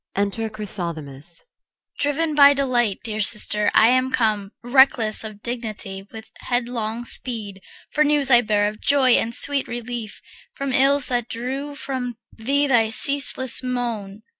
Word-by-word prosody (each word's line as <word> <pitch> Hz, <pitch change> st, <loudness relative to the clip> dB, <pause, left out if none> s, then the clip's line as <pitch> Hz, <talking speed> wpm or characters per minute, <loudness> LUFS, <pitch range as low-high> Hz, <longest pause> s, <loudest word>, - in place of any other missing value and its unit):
Enter 205 Hz, +3 st, -2 dB
CHRYSOTHEMIS. 170 Hz, -8 st, -8 dB
CHR. -, -, -17 dB
Driven 300 Hz, +2 st, 0 dB
by 285 Hz, -1 st, +6 dB
delight, 245 Hz, -7 st, 0 dB
dear 215 Hz, -1 st, -4 dB
sister, 210 Hz, 0 st, +3 dB
I 220 Hz, -, +6 dB
am 255 Hz, +1 st, +2 dB
come, 215 Hz, -5 st, -1 dB
Reckless 245 Hz, -4 st, +3 dB
of 215 Hz, -1 st, -10 dB
dignity, 215 Hz, -5 st, -6 dB
with 220 Hz, 0 st, -11 dB
headlong 240 Hz, -2 st, -3 dB
speed. 215 Hz, -7 st, -3 dB, 0.3 s
For 305 Hz, -, +2 dB
news 290 Hz, -2 st, +1 dB
I 240 Hz, -1 st, +7 dB
bear 210 Hz, -2 st, 0 dB
of 215 Hz, +1 st, -7 dB
joy 275 Hz, -3 st, +3 dB
and 230 Hz, -1 st, +2 dB
sweet 285 Hz, -2 st, +1 dB
relief 240 Hz, -2 st, -6 dB, 0.4 s
From 275 Hz, -1 st, -4 dB
ills 275 Hz, +1 st, +3 dB
that 245 Hz, -2 st, -2 dB
drew 270 Hz, +5 st, -5 dB
from 255 Hz, -4 st, -5 dB, 0.2 s
thee 280 Hz, +6 st, 0 dB
thy 235 Hz, -5 st, +2 dB
ceaseless 270 Hz, +1 st, +3 dB
moan. 230 Hz, -5 st, -4 dB
240 Hz, 145 wpm, -21 LUFS, 215-265 Hz, 0.4 s, I